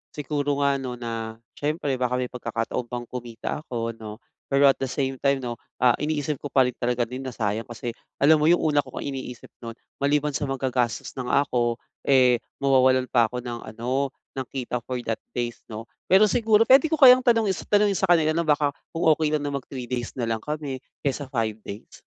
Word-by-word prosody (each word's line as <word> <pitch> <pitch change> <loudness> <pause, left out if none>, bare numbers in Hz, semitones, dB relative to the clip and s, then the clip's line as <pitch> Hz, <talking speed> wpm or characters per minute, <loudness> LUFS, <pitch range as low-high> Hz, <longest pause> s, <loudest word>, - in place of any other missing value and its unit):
siguro 145 -1 -1
nga 140 -1 +2
'no, 130 -2 -5
na 115 -2 -5 0.2
syempre 150 0 -2
baka 125 0 0
may 125 -1 -2
pagkakataon 120 0 -3
pang 120 0 -5
kumita 120 +1 -6
ako 115 -5 -3
'no, 110 0 -8 0.3
pero 140 0 +5
at - - -8
the 135 - -1
same 135 0 -2
time 140 -1 +1
'no, 120 -1 -4 0.2
ah, 125 - +7
iniisip 150 -1 -2
ko - - -5
pa 135 -1 +4
rin 125 - 0
talaga 120 0 0
din 125 +3 -6
na 125 - -6
sayang 110 +2 -2
kasi 120 0 -5 0.2
alam 155 +2 +5
mo 150 - +2
yung 175 +1 +4
una 150 -2 +3
ko 135 -2 -4
ngang 140 - -4
iniisip 130 -2 -8
no'n 115 -1 -8 0.2
maliban 145 +1 +1
sa 145 +1 -2
maggagastos 130 -4 -1
na 125 - -4
nga - - +1
ako, 120 -3 0 0.3
eh, 125 -3 +5 0.2
mawawalan 130 -1 +3
pa 120 -2 +4
ako 125 +2 -6
ng 120 -1 -5 0.2
ano, 130 +4 -1 0.3
ng 130 - -4
kita 125 -2 -3
for 130 - -3
that 115 -2 -2 0.2
days 120 -1 -3
'no. 110 0 -7 0.2
Pero 190 +3 +6
siguro, 225 -2 +4
pwede 265 +6 +6
ko 320 - +1
kayang 255 -4 +8
tanungis 225 -6 +2
tanungin 205 -1 +3
sa 190 - +1
kanila 160 -3 +4
na 165 0 -1
baka 145 -1 +3 0.2
kung 165 - -1
okey 155 -1 +1
lang 150 - -2
na 145 - -2
mag-3 135 -2 -5
days 120 -1 -4
na 125 - -3
lang 115 -1 -1
kami 145 -1 -4 0.2
kaysa 140 0 -2
5 110 -4 -2
days? 100 0 -10
130 Hz, 210 wpm, -25 LUFS, 120-150 Hz, 0.3 s, kayang